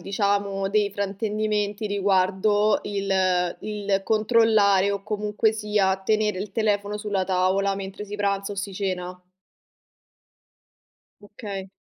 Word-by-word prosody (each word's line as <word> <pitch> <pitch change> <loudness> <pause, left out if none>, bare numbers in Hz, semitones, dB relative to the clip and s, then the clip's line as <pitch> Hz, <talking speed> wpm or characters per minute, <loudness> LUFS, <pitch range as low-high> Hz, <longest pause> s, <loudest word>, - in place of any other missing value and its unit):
diciamo 200 -1 -1
dei 205 0 +1
fraintendimenti 210 +1 -2
riguardo 200 +1 +2
il 190 -3 0
il 205 -2 -1
controllare 215 -3 +3
o 200 -1 -4
comunque 210 +1 0
sia 210 -3 +1
tenere 210 0 0
il 195 +1 -5
telefono 205 -1 0
sulla 205 -3 -2
tavola 190 +1 +1
mentre 195 +1 -6
si 205 0 -8
pranza 200 -1 -1
o - - -6
si 200 0 -4
cena? 185 -2 -4 2.0
Okay. 200 -2 -8
200 Hz, 110 wpm, -24 LUFS, 195-210 Hz, 2.0 s, controllare